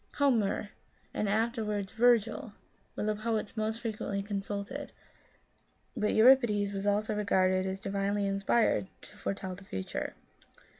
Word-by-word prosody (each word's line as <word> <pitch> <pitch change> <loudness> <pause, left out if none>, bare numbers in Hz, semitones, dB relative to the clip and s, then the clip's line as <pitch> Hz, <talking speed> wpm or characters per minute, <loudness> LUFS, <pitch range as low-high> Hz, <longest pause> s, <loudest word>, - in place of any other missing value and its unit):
Homer, 225 -7 +1 0.4
and 210 - -1
afterwards 215 -2 0
Virgil, 225 -2 +2 0.4
were - - -2
the 215 0 +1
poets 215 0 -2
most 220 +1 -2
frequently 210 -3 -3
consulted, 205 +6 -4 1.0
but 210 - +1
Euri 255 +5 +9
pides 205 -4 0
was 195 +1 -3
also 210 +2 +1
regarded 185 -2 +2
as 190 0 -3
divinely 200 +1 -1
inspired 195 +1 +2 0.2
to - - -13
fore 195 - -3
telj 185 -2 -6
the - - -14
future. 95 - -4
210 Hz, 135 wpm, -31 LUFS, 195-220 Hz, 1.0 s, Euri